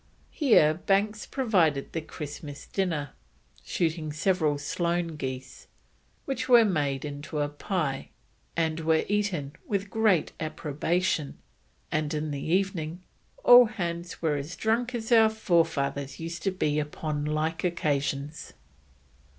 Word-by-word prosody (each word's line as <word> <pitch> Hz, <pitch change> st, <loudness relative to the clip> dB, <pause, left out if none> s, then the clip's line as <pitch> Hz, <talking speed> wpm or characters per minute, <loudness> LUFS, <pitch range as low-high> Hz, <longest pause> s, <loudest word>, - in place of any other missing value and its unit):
Here 220 Hz, -, +5 dB
Banks 200 Hz, +5 st, 0 dB
provided 180 Hz, -, +1 dB
the 165 Hz, -, -2 dB
Christmas 150 Hz, -1 st, -8 dB
dinner, 165 Hz, -8 st, -2 dB, 0.5 s
shooting 160 Hz, -2 st, -1 dB
several 155 Hz, -2 st, +1 dB
solan 170 Hz, +3 st, -1 dB
geese, 130 Hz, -3 st, -6 dB, 0.6 s
which 260 Hz, -2 st, -3 dB
were 240 Hz, -2 st, +8 dB
made 145 Hz, -8 st, 0 dB
into 145 Hz, +2 st, -6 dB
a 145 Hz, -, +1 dB
pie, 145 Hz, -2 st, -3 dB, 0.5 s
and 160 Hz, -1 st, +1 dB
were 160 Hz, 0 st, +2 dB
"eaten 195 Hz, -9 st, -1 dB, 0.2 s
with 200 Hz, -1 st, -2 dB
great 215 Hz, -7 st, +2 dB
approbation; 155 Hz, +1 st, -1 dB, 0.5 s
and 155 Hz, 0 st, 0 dB
in 150 Hz, 0 st, -2 dB
the 140 Hz, -1 st, -4 dB
evening 180 Hz, -1 st, -1 dB, 0.4 s
all 245 Hz, 0 st, +9 dB
hands 175 Hz, -6 st, -4 dB
were 150 Hz, -3 st, +2 dB
as 145 Hz, +6 st, -5 dB
drunk 235 Hz, +5 st, 0 dB
as 225 Hz, 0 st, -4 dB
our 225 Hz, -2 st, +7 dB
forefathers 160 Hz, -9 st, 0 dB
used 165 Hz, +1 st, -5 dB
to 195 Hz, -, 0 dB
be 150 Hz, -5 st, 0 dB
upon 150 Hz, 0 st, -3 dB
like 155 Hz, +2 st, -1 dB
occasions." 145 Hz, -3 st, -1 dB
165 Hz, 125 wpm, -27 LUFS, 150-195 Hz, 0.6 s, all